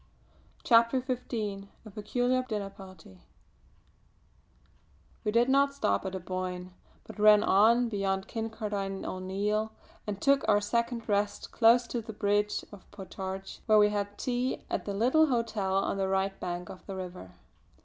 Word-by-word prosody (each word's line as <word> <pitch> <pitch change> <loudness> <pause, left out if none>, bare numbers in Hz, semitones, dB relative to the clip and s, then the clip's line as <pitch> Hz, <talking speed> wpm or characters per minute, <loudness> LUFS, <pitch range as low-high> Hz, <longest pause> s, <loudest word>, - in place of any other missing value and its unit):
CHAPTER 230 +1 +4
XV 230 -6 -4 0.2
A 215 - -10
PECULIAR 245 +5 0
DINNER 205 -3 -3
PARTY 185 - -14 2.0
We 210 - 0
did 235 +2 +3
not 280 +1 +3
stop 100 - 0
at 190 - -5
Aboyne, 185 0 -5 0.3
but - - -12
ran 210 0 +7
on 230 +5 +4
beyond 195 -3 -1
Kincardine 210 -3 -4
O'Neill, 205 +4 -2 0.4
and 205 -2 -3
took 275 +3 +3
our 205 -1 +5
second 235 +2 -2
rest 205 -1 -1
close 235 +1 +5
to 235 0 -3
the 220 0 -8
Bridge 205 0 0
of 205 -2 -14
Potarch 190 -1 -7
where 215 -1 +6
we 210 0 +6
had 205 0 -3
tea 250 +1 -2
at - - -2
the 200 - -3
little 260 +9 +4
hotel 225 -7 -1
on 195 0 0
the 195 -1 0
right 195 0 -1
bank 175 0 -4
of 185 - -10
the 195 - -5
river. 180 - -8
205 Hz, 150 wpm, -29 LUFS, 195-230 Hz, 2.0 s, ran